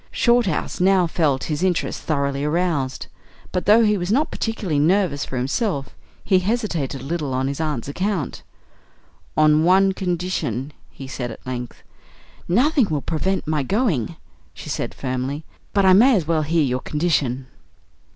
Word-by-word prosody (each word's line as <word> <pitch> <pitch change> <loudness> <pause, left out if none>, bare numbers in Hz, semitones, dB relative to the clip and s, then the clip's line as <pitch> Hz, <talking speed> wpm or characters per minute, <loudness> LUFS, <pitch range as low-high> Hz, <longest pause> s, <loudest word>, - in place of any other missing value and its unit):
Shorthouse 235 -8 +1
now 190 -1 +4
felt 155 -5 0
his 150 0 -3
interest 185 -3 0
thoroughly 140 -2 -1
aroused; 150 -4 -1 0.5
but, 180 0 -2
though 220 +3 +7
he 210 -2 +2
was 175 +2 -2
not 285 +7 +2
particularly 200 -9 -2
nervous 165 -2 +2
for 130 - -5
himself, 140 - -1 0.3
he 190 -2 +3
hesitated 185 - -2
a - - -9
little 145 -3 -2
on 130 +1 0
his 140 +3 -3
aunt's 150 -7 -2
account. 185 +1 -2 1.0
"On 155 0 +5
one 190 +3 +5
condition," 170 - -2 0.2
he 135 - -10
said 130 -2 -5
at 115 - -11
length. 125 -1 -6 0.6
"Nothing 255 - +3
will 150 -3 -1
prevent 190 +4 -1
my 155 -1 0
going," 170 - 0 0.4
she - - -9
said - - -3
firmly; 130 +4 -3 0.3
"but 200 -1 +2
I 190 - +7
may 240 +7 +6
as 180 -6 0
well 160 0 +1
hear 160 +1 +1
your 125 -2 0
condition." 145 -5 0
160 Hz, 155 wpm, -22 LUFS, 140-190 Hz, 1.0 s, though